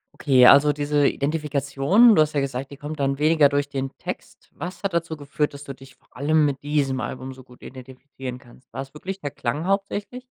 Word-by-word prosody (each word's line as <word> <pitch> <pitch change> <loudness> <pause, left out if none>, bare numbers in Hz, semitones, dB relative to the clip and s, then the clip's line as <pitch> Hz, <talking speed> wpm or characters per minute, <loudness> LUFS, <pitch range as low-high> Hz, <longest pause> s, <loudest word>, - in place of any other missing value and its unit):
Okay, 130 -4 +4
also, 140 +3 +7
diese 145 -1 +1
Identifikation, 150 - +2
du 155 - +5
hast 155 0 +1
ja 145 - +1
gesagt, 135 -1 -3
die 140 - -11
kommt 150 +2 -7
dann 135 0 0
weniger 150 0 +4
durch 145 0 0
den 135 -1 -4
Text. - - -9
Was 180 +6 -8
hat 195 -3 -2
dazu 165 -2 -2
geführt, 145 0 -2
dass 140 - -10
du 140 -1 -7
dich 135 0 -16
vor - - -35
allem 150 +3 +2
mit 140 -2 -2
diesem 140 -3 -1
Album 130 +2 -6
so 130 0 -14
gut 125 0 -19
identifizieren 130 0 -9
kannst? 125 +1 -20
War's 135 +1 -7
wirklich 190 +5 -7
der 145 - -4
Klang 145 +3 -3
hauptsächlich? 200 +5 -2
145 Hz, 210 wpm, -23 LUFS, 135-155 Hz, -, also